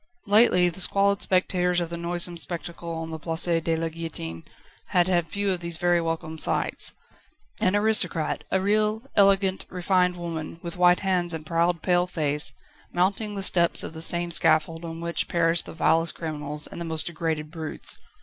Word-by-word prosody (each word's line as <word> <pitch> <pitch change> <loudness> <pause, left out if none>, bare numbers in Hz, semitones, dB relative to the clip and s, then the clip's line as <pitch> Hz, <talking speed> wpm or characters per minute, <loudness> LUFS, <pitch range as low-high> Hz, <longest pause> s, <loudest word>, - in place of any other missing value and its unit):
Lately 205 -4 +5
the 175 +2 -3
squalid 200 +1 +2
spectators 180 -1 +1
of 170 -1 -4
the - - -3
noisome 175 +1 +1
spectacle 170 0 -5
on 165 0 -6
the 160 - -6
Place 165 +1 -2 0.2
de 165 0 0
la 165 0 -2
Guillotine 160 - -7 0.4
had 175 0 +2
had 175 -3 +1
few 200 +4 -1
of 185 - -2
these 170 -1 -4
very 175 0 +2
welcome 160 -1 -4
sights: - - +2 0.7
an 185 +2 +2
aristocrat 205 -7 0
a 190 - +1
real, 215 +3 +1
elegant, 195 -2 +3
refined 180 0 +1
woman, 165 -2 -6
with 170 -1 -5
white 180 0 +4
hands 180 -3 0
and 155 -1 -8
proud, 170 +1 0
pale 180 -1 +2
face 150 -4 0 0.4
mounting 200 +4 0
the 195 - -3
steps 170 -2 +3
of - - -7
the 160 - -7
same 175 +1 +3
scaffold 165 0 +3
on 165 0 -7
which 170 0 -1
perished 165 0 +1
the - - -7
vilest 165 +1 +1
criminals 150 -2 -5
and 170 - -8
most 160 -1 0
degraded 160 -2 -3
brutes. 160 -2 0
170 Hz, 175 wpm, -25 LUFS, 165-180 Hz, 0.7 s, Lately